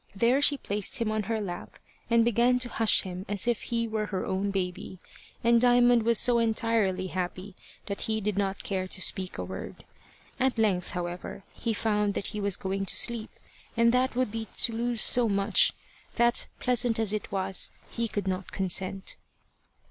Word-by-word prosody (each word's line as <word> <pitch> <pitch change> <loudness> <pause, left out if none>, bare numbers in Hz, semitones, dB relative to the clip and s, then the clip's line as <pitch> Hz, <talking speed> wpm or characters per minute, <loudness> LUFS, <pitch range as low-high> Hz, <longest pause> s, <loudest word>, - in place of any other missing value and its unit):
There 235 +7 +3
she 285 0 +5
placed 205 0 0
him 230 -3 -1
on 215 0 0
her 225 -1 0
lap 180 -4 -6 0.3
and 230 -1 +4
began 240 +2 +3
to 250 -1 +1
hush 225 -2 +4
him 185 0 -6
as 205 +1 +2
if 240 -2 +1
he 230 -1 -2
were 215 -1 -2
her 190 -3 -3
own 195 +2 -1
baby, 185 -1 -4 0.5
and 235 0 +4
Diamond 245 -1 +5
was 230 0 +3
so 240 +3 +5
entirely 225 -4 +1
happy 185 +1 -5 0.3
that 200 -1 -4
he 220 0 -1
did 210 -1 -2
not 195 -1 -2
care 190 -2 -2
to 190 - -1
speak 185 0 0
a 90 - -3
word. 95 +1 -8 0.5
At 260 -1 +1
length, 200 -5 +1
however, 175 +2 -5
he 225 -2 -3
found 210 -2 0
that - - -2
he 210 - -4
was 200 -2 +1
going 195 +1 -3
to - - +3
sleep, 235 -2 0 0.5
and 235 0 +5
that 250 +1 +1
would 255 -4 0
be 225 0 -5
to 230 - +1
lose 235 0 0
so 240 -2 +3
much, 200 0 +3 0.4
that, 235 0 +2
pleasant 245 -2 +1
as 220 -2 +2
it 215 - -4
was, 190 -1 -1 0.2
he 235 0 -2
could 205 -3 -4
not 185 0 -3
consent. 190 0 -1
215 Hz, 185 wpm, -28 LUFS, 190-235 Hz, 0.5 s, she